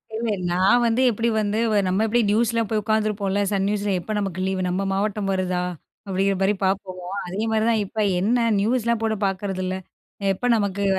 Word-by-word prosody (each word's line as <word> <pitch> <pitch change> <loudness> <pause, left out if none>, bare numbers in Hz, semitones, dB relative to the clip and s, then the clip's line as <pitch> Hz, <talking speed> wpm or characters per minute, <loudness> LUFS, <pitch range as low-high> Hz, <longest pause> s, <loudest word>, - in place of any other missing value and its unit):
இல்ல, 230 +1 -2 0.2
நான் 190 +7 +4
வந்து 230 +2 +2
எப்படி 230 +2 0
வந்து 210 +1 -1 0.3
நம்ம 190 +4 +1
எப்படி 240 +2 +2
நியூஸ்லா 230 +1 +2
போய் 215 -1 0
உட்காந்துருப்போம்ல, 210 -2 0
சன் 195 -1 +1
நியூஸில 205 -1 0
எப்ப 215 +5 -5
நமக்கு 195 -3 -3
லீவ் 190 0 -1
நம்ம 190 +2 -1
மாவட்டம் 200 0 -1
வருதா 185 -1 -1 0.4
அப்படிங்கிற 195 +1 +1
மாரி 195 +2 +3
பார்ப்போம். 190 -1 -2 0.3
அதே 190 +4 -4
மாதிரி 220 0 +2
தான் 220 - +2
இப்ப 215 +3 -6 0.2
என்ன 230 +4 +2
நியூஸ்லாம் 235 +1 +1
போட்டு 220 -1 0
பார்க்குறதில்ல, 185 -1 -3 0.6
எப்ப 245 +6 -3
நமக்கு 200 -2 -1
205 Hz, 170 wpm, -23 LUFS, 190-220 Hz, 0.6 s, நான்